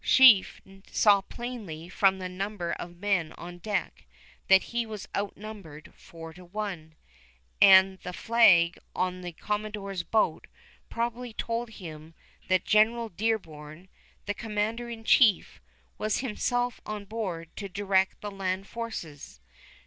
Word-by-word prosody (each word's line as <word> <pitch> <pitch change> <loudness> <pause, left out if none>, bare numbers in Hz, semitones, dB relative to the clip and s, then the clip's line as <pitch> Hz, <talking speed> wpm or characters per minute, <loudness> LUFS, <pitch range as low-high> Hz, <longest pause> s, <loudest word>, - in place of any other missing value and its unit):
Sheaffe 250 -7 +6 0.3
saw 205 -2 +5
plainly 200 -8 -7
from 190 +1 +2
the 185 -1 -5
number 185 -1 -4
of 175 0 -7
men 190 -4 0
on 175 0 -10
deck 205 +1 -3 0.4
that 190 0 +6
he 235 0 +1
was 215 -3 -8
outnumbered 200 -6 -7
four 165 -1 -11
to 180 +2 -13
one, 180 -4 -6 0.7
and 190 -1 +7
the 180 - -7
flag 180 -5 +4 0.2
on 185 0 -1
the 175 -1 -6
commodore's 210 0 -4
boat 220 +5 0 0.4
probably 235 +1 -3
told 230 +1 -3
him 160 -6 -10 0.3
that 185 -1 +2
General 225 +2 +3
Dearborn, 170 -5 -4 0.4
the 205 - -1
commander 225 +2 -3
in 225 -1 -8
chief, 220 - +4 0.4
was 215 0 0
himself 245 0 -1
on 210 -1 -6
board 190 -6 -5
to 200 -2 -5
direct 190 0 0
the 205 - -5
land 195 -1 -3
forces. 200 - -7
200 Hz, 130 wpm, -28 LUFS, 175-220 Hz, 0.7 s, and